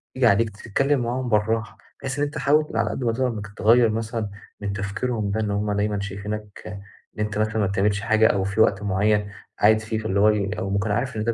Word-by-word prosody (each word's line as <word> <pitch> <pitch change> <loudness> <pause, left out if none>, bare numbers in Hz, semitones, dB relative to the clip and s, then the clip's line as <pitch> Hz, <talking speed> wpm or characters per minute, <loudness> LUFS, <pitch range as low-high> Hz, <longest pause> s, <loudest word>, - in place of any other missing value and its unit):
ييجي 130 -2 +4
عليك 110 +2 +3
تتكلم 130 +7 0
معاهم 120 +1 -2
بالراحة، 110 0 0 0.2
بحيث 135 +1 -4
إن - - +2
أنت 145 - -6
حاول 150 +3 +3
على 115 -2 +1
قدّ 130 - -4
ما 115 - +2
تقدر 130 +2 0
إنك 105 -4 -4
تغيّر 115 +1 +5
مثلًا 110 -1 -3 0.3
من 100 -1 -3
تفكيرهم 105 +2 -2
ده، 110 - -1
إن 105 -2 -1
هُم 105 +1 -1
دايمًا 105 0 0
شايفينك 100 0 -6 0.5
إن - - -9
أنت 105 0 -2
مثلًا 110 +1 0
ما 100 -3 +2
بتعملش 100 +1 +1
حاجة 110 0 +4
أو 95 -1 +1
في 100 +3 0
وقت 100 -2 +3
معيّن 105 +1 +1 0.3
قاعد 110 +1 +5
فيه، 110 0 -3
فاللي 100 -2 -1
هو 105 +1 +6
ال 105 -1 0
أو 95 - -3
ممكن 100 +2 0
عارف 120 +3 -1
إن 105 - -1
ده 115 0 0
105 Hz, 230 wpm, -23 LUFS, 100-115 Hz, 0.5 s, هو